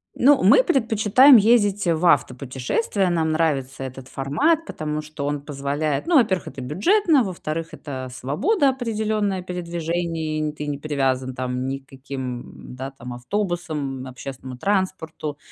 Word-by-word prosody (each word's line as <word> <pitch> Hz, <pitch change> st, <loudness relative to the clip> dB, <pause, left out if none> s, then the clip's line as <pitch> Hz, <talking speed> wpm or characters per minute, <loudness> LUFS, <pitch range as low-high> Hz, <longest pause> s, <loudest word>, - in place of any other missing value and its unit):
Ну, 280 Hz, +3 st, +5 dB
мы -, -, +7 dB
предпочитаем 250 Hz, -, +5 dB
ездить, 205 Hz, -3 st, +4 dB
в 170 Hz, +1 st, +1 dB
автопутешествия. 135 Hz, -, +1 dB
Нам 160 Hz, -2 st, +1 dB
нравится 135 Hz, -5 st, -1 dB
этот 130 Hz, 0 st, -8 dB
формат, 300 Hz, -, +1 dB
потому 155 Hz, -, -4 dB
что 150 Hz, -2 st, -6 dB
он 145 Hz, -1 st, -2 dB
позволяет 145 Hz, -, -2 dB
ну, 345 Hz, -, +3 dB
во-первых, 210 Hz, -9 st, +3 dB
это 135 Hz, -, -7 dB
бюджетно, 290 Hz, -, +3 dB
во-вторых, 165 Hz, -3 st, -4 dB
это 130 Hz, -3 st, -6 dB
свобода 270 Hz, -, +1 dB
определённая 215 Hz, -6 st, -1 dB
передвижений 170 Hz, -3 st, -3 dB
н 150 Hz, -1 st, -2 dB
ты 150 Hz, -1 st, -6 dB
не 145 Hz, -1 st, -2 dB
привязан 130 Hz, -3 st, -1 dB
там 125 Hz, 0 st, -3 dB
ни 135 Hz, +1 st, -2 dB
к 135 Hz, -, -29 dB
каким, 130 Hz, -2 st, -7 dB
да, 135 Hz, +1 st, -5 dB
там 125 Hz, -2 st, -9 dB
автобусам, 150 Hz, -3 st, -3 dB
общественному 130 Hz, 0 st, -8 dB
транспорту, 175 Hz, -5 st, -2 dB
155 Hz, 140 wpm, -23 LUFS, 135-205 Hz, -, мы